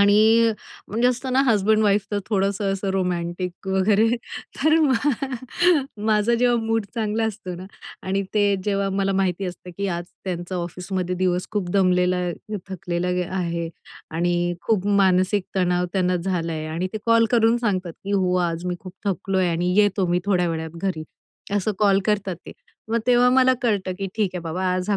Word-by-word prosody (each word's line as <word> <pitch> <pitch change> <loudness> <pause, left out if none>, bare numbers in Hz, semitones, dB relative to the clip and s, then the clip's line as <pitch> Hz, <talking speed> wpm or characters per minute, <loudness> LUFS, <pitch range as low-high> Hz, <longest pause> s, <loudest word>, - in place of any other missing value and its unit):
आणि 220 +3 +5 0.4
म्हणजे 235 +4 +2
असत 250 +1 -2
ना 260 - +4
हजबेंड-वाइफ 210 -2 +3
तर 205 - 0
थोडंसं 195 -1 0
असं 195 0 -2
रोमॅंटिक 180 -1 -3
वगैरे, 200 +3 +3 0.5
तर 310 +3 +3
मग 280 -2 +2 1.0
माझं 215 +2 +3
जेव्हा 240 0 +3
मूड 225 -1 0
चांगला 225 -1 0
असतो 205 -4 -4
ना 180 +2 -8 0.4
आणि 195 +1 0
ते 210 -1 +3 0.2
जेव्हा 200 -1 0
मला 195 0 0
माहिती 190 0 0
असतं 180 0 -8
की 200 - -1
आज 175 -1 -3 0.2
त्यांचा 180 0 -4
ऑफिसमध्ये 180 +1 -3
दिवस 180 0 0
खूप 205 -4 -2
दमलेला, 180 -1 +2 0.5
थकलेला 180 -1 -3 0.3
आहे. 170 -2 -2 0.4
आणि 175 +1 0
खूप 205 -4 +1
मानसिक 190 -1 +3
तणाव 180 -1 +2
त्यांना 185 -2 +1
झाला 170 -2 -2
आहे. 155 -1 -4
आणि 165 +4 -2
ते 215 - -3
कॉल 230 0 +5
करून 230 -1 +4
सांगतात 190 -7 -1
की 200 - -3
"हो! 185 -2 +2 0.2
आज 165 +1 -5
मी 180 - -1
खूप 185 - -10
थकलो 195 0 -1
आहे 185 -1 +2
आणि 175 +2 0
येतो 205 -2 +3
मी 175 +1 +1
थोड्या 180 -3 +2
वेळात 160 0 -4
घरी." 180 -5 -2 0.5
असं 205 +1 +1
कॉल 200 -2 +4
करतात 200 -4 0
ते. - - -8 0.4
मग 230 +1 +1
तेव्हा 245 0 +5
मला 260 0 +5
कळतं 200 -5 0
की 195 - -2
ठीक 210 -4 0
आहे 180 - -3
बाबा 170 +3 -3
आज 185 +1 -3
हा 205 - +3
195 Hz, 175 wpm, -23 LUFS, 180-210 Hz, 1.0 s, आणि